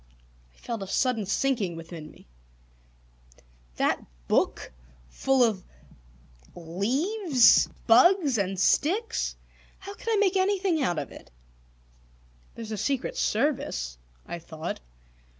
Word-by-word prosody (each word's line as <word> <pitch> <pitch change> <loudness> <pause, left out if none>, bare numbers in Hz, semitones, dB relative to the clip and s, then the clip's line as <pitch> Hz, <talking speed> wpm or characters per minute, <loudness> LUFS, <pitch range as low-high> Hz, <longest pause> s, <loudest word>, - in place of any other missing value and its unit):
I - - -29
felt 230 -3 -5
a 195 - -5
sudden 225 -1 0
sinking 215 -6 0
within 165 -1 -9
me. - - -18 1.5
That - - 0 0.2
book - - 0 0.4
full 270 - +2
of 215 -6 0 0.9
leaves, 255 - +3 0.2
bugs, 280 - +5
and 190 -1 -1
sticks? 405 - +1 0.4
How 395 +1 -9
could 460 - -7
I 450 - +3
make 400 -2 +2
anything 375 -4 +1
out 175 -10 0
of - - -4
it? - - -13 1.3
"There's 225 -2 -7
the 215 - -4
Secret 275 - -2
Service," 65 - -1 0.3
I 170 - -6
thought. 160 0 -6
245 Hz, 115 wpm, -27 LUFS, -, 1.5 s, bugs